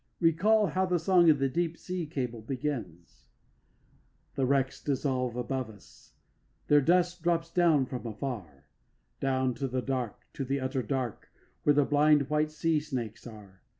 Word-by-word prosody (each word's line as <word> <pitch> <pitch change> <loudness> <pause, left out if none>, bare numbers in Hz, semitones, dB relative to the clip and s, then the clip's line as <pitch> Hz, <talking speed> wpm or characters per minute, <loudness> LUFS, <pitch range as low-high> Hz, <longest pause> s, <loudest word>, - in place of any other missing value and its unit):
Recall 195 +6 +4
how 185 +2 0
the 180 -1 +2
song 175 0 +4
of 150 - +5
the 135 0 +1
deep 165 +4 -1
sea 180 -3 -4
cables 125 -6 -4
begins: 105 - -5 1.1
The 135 -2 0
wrecks 135 0 0
dissolve 130 -3 -1
above 125 0 -3
us; 105 -3 -17 0.6
their 145 0 +6
dust 175 +3 +2
drops 165 0 0
down 165 -6 +4
from 125 -1 -6
afar 105 - -6 0.5
Down 130 -1 +1
to 135 +2 -3
the 130 0 -2
dark, 125 -3 -3
to 140 - -4
the 135 +2 -1
utter 130 0 -1
dark, 125 -1 -3 0.3
where 145 - +3
the 145 -1 +4
blind 150 -1 +3
white 150 0 +2
sea 155 +1 0
snakes 120 -7 -5
are. 100 -5 -13
135 Hz, 155 wpm, -29 LUFS, 125-160 Hz, 1.1 s, their